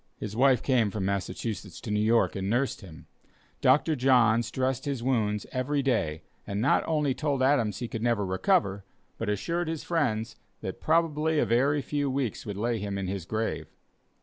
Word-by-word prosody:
His 105 0 -6
wife 130 0 +4
came 120 -6 +2
from 100 -2 -3
Massachusetts 100 +3 -3
to 110 - -5
New 105 - +1
York 115 +2 +3
and 95 0 -2
nursed 125 +4 0
him. 85 -6 -12 0.6
Dr. 155 +1 +4
Johns 120 -4 +3
dressed 130 0 -1
his 135 -5 -3
wounds 105 -5 0
every 140 +3 -1
day, 80 - 0 0.2
and 100 0 -2
not 130 +6 +3
only 150 -4 +1
told 140 -2 -1
Adams 120 -7 +2
he 120 - -4
could 115 - -5
never 115 -3 +1
recover, 100 - +1 0.4
but 115 - -2
assured 170 - -1
his 160 -1 -3
friends, 115 -10 -1 0.2
that - - -6
probably 160 -1 +2
a - - +3
very 140 +5 +2
few 145 0 -1
weeks 130 -6 -2
would 100 -1 -4
lay 115 +2 -1
him 100 -1 -3
in 95 - -3
his 95 -2 -4
grave. 110 +4 -3
120 Hz, 180 wpm, -28 LUFS, 105-140 Hz, 0.6 s, wife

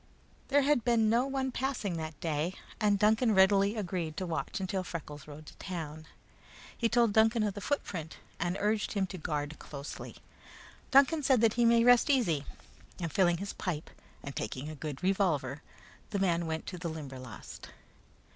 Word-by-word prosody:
There 285 0 +4
had 280 -4 +3
been 225 -2 +3
no 240 +3 +3
one 265 -1 -1
passing 250 -9 -2
that 155 -1 -6
day, 165 +3 -1 0.2
and 210 -2 +3
Duncan 220 +2 +3
readily 195 +2 +5
agreed 175 -6 -3
to 185 - -2
watch 165 +1 -3
until 190 0 -2
Freckles 150 -5 -7
rode 150 +1 -10
to - - -12
town. 160 -4 -6 0.7
He 230 - +1
told 235 -3 +3
Duncan 225 +1 +4
of 205 -2 0
the 205 - -7
footprint, 180 - -3 0.2
and 175 +2 -1
urged 210 +1 0
him 200 -3 +1
to 185 0 -7
guard 150 -1 -3
closely. 140 0 -8 0.7
Duncan 280 +4 +5
said 240 -5 +4
he 240 0 +2
might 230 0 +5
rest 245 +3 +6
easy, 175 - +2 0.5
and 165 -4 -3
filling 175 -3 +3
his 200 +3 -5
pipe 165 -5 -4 0.3
and 140 - -7
taking 130 +7 -4
a 155 - -7
good 145 0 -6
revolver, 160 -8 +1 0.5
the 205 - -2
big - - -1
man 170 -2 +1
went 160 0 -3
to 180 - -6
the 170 -1 -3
Limberlost. 130 -7 -8
190 Hz, 175 wpm, -31 LUFS, 155-225 Hz, 0.7 s, rest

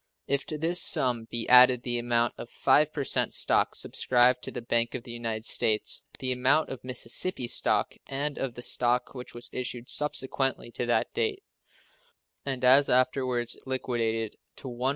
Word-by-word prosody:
If 140 0 -1
to 155 - -4
this 170 +3 +3
sum 120 -3 +3
be 115 -1 -2
added 125 -1 +6
the 120 -1 -1
amount 120 0 0
of 120 - -8
5% 150 -2 +1
stock - - +2
subscribed 125 0 +2
to - - -7
the 120 - -7
Bank 115 +1 0
of 125 - -5
the 120 - -9
United 115 -2 -5
States, 110 -1 0
the 130 -1 -2
amount 130 +5 +1
of 130 -2 -8
Mississippi 125 +4 0
stock 120 - +1
and 140 +2 -3
of 130 -3 -4
the 120 - -7
stock 125 0 -1
which 125 -2 -10
was 120 - -4
issued 125 -1 -5
subsequently 135 -4 0
to 120 - -4
that 120 - 0
date, 430 -3 -2 1.0
and 130 -2 -4
as 135 +3 +5
afterwards 125 -1 0
liquidated, 115 -4 -2 0.2
to 130 - -9
$158,713,049. - - -7
125 Hz, 165 wpm, -27 LUFS, 120-135 Hz, 1.0 s, added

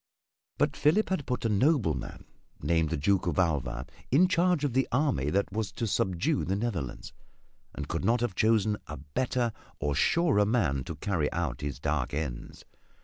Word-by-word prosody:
But - - +1
Philip 165 +9 +3
had 185 -7 -2
put 125 -2 -2
a - - +4
nobleman 105 - +1 0.3
named 80 -2 +1
the - - -1
Duke 90 +6 +1
of 85 - -1
Alva 65 -8 0 0.2
in 165 +8 +5
charge 180 -3 +2
of 140 -5 0
the 130 0 +2
army 120 - +1
that 100 +5 0
was 110 -1 -2
to 115 - -2
subdue 90 -5 0
the 95 +5 -1
Netherlands, 100 - -4 0.6
and - - -5
could - - -3
not 120 +2 +3
have 120 -5 0
chosen 110 +1 +2
a 75 - -6
better 120 - -1 0.3
or 75 0 0
surer 140 - +3
man 95 - +1
to 80 - -5
carry 80 -2 -1
out 75 -7 -2
his 70 -2 -4
dark 75 -2 -1
ends. 70 -6 -5
95 Hz, 175 wpm, -29 LUFS, 75-120 Hz, 0.6 s, in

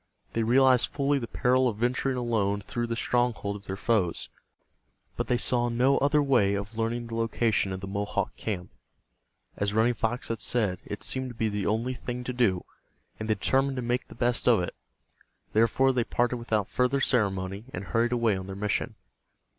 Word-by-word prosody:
They 115 - 0
realized 125 +2 +4
fully 140 0 0
the 120 - -5
peril 130 +1 +2
of 110 -4 -2
venturing 125 +3 0
alone 110 -5 0
through 120 +3 -3
the 115 - -2
stronghold 120 -4 0
of 100 - -10
their 95 - -4
foes, 105 -6 0 0.9
but - - -3
they 125 - +2
saw 120 0 +3
no 125 +4 +3
other 145 +1 +3
way 120 -8 +3
of 100 +2 -5
learning 115 +1 -1
the 115 0 -6
location 115 -3 +1
of 95 0 -5
the 95 - -6
Mohawk 100 +1 -2
camp. 95 -5 -4 0.9
As 100 0 -1
Running 115 +2 +3
Fox 120 +2 -2
had 115 -1 -2
said, 95 -3 0
it 105 - -6
seemed 130 -1 -1
to 120 - -9
be 110 -1 0
the 105 -3 -2
only 115 +4 0
thing 125 0 -5
to 125 - -4
do, 105 -8 +1 0.5
and 110 0 -5
they 110 - +3
determined 135 +6 +1
to 125 - -3
make 120 +2 -1
the - - -13
best 120 -1 0
of 120 -3 +6
it. 90 - -4 0.8
Therefore, 115 +4 +3
they 125 -2 +1
parted 120 +1 0
without 110 -4 -1
further 125 +2 +1
ceremony, 100 -5 0
and 90 - -5
hurried 115 +6 0
away 115 -4 +2
on 95 0 -6
their 95 - -6
mission. 105 +1 -2
115 Hz, 195 wpm, -27 LUFS, 105-125 Hz, 0.9 s, of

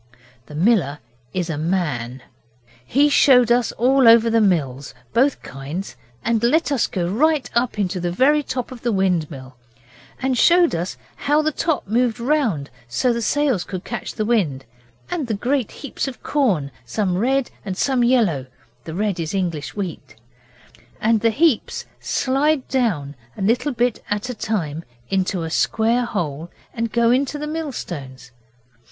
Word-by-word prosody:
The 150 - -10
miller 165 - +2 0.3
is 180 -2 -2
a 160 -4 -3
MAN. 145 -8 -2 0.6
He 275 - +3
showed 250 -4 +5
us 240 -1 +3
all 260 +1 +4
over 230 0 +7
the 225 0 +4
mills 140 -10 0 0.2
both 270 +3 +2
kinds 135 +3 -6 0.3
and 230 -2 +1
let 300 +6 +2
us 270 -5 +2
go 175 -3 -2
right 280 - +2
up 240 -1 0
into 190 -2 -1
the 175 0 -1
very 280 +10 +3
top 260 -3 -4
of 250 -2 -9
the 240 - 0
wind 185 -6 +1
mill, 130 -3 -10 0.6
and 260 0 0
showed 345 +6 +5
us 170 +2 -3 0.2
how 295 +2 +2
the 310 - +1
top 315 - -1
moved 240 +2 +1
round 235 - 0 0.2
so 120 - 0
that - - +3
the 235 - -2
sails 265 -6 +1
could 185 -1 -6
catch 240 - -5
the 215 - -1
wind, 170 - 0 0.5
and 310 -7 -2
the 220 - -1
great 250 +2 0
heaps 280 0 -5
of 265 - -8
corn, 195 - +1
some 180 - -1
red 260 +6 +1
and 190 -3 -5
some 260 0 +2
yellow 210 - +2 0.4
(the 160 - -6
red 200 -2 -1
is 165 +3 -3
English 170 -6 -2
wheat), 180 -9 -6 0.8
and 220 -1 +2
the 230 - +4
heaps 280 0 +1
slice 280 +3 +1
down 200 - 0 0.2
a - - -6
little 240 +8 +1
bit 245 -2 0
at 205 +5 -2
a - - -4
time 170 -9 -3 0.3
into 185 -2 0
a 160 - -4
square 230 +7 +1
hole 170 -8 -3 0.2
and 230 -2 -2
go 235 0 +3
down 265 +3 +2
to 295 - -5
the 295 - -4
mill 310 -1 -3
stones. 130 - -7
220 Hz, 170 wpm, -21 LUFS, 170-255 Hz, 0.8 s, over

